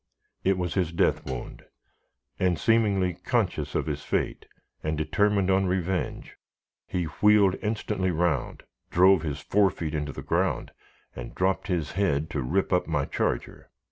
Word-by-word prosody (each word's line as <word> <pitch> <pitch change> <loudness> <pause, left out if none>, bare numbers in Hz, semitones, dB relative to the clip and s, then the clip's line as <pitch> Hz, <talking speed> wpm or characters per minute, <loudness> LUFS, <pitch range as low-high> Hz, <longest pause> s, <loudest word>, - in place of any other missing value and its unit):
It 95 0 +2
was 90 -1 -2
his 90 -4 0
death 85 - +1
wound; 65 -2 -6 0.8
and, 90 -2 +2
seemingly 100 -3 +2
conscious 90 - -1
of - - 0
his - - -3
fate, - - -2 0.3
and 80 0 -2
determined 100 +4 +2
on 95 0 +3
revenge, 90 0 -2 0.5
he 90 - -1 0.2
wheeled 105 -3 +5
instantly 105 -3 -1
round, 85 -5 -1 0.3
drove 95 0 +5
his 75 -2 -3
fore 100 +2 +3
feet 80 -4 -5
into 75 -1 -2
the - - -8
ground, - - 0 0.4
and - - -8
dropped 95 +3 0
his 85 -6 -1
head 80 -5 0
to 70 - -2
rip 90 +10 0
up 90 - +2
my 75 -4 0
charger. - - -3
90 Hz, 150 wpm, -27 LUFS, 80-95 Hz, 0.8 s, wheeled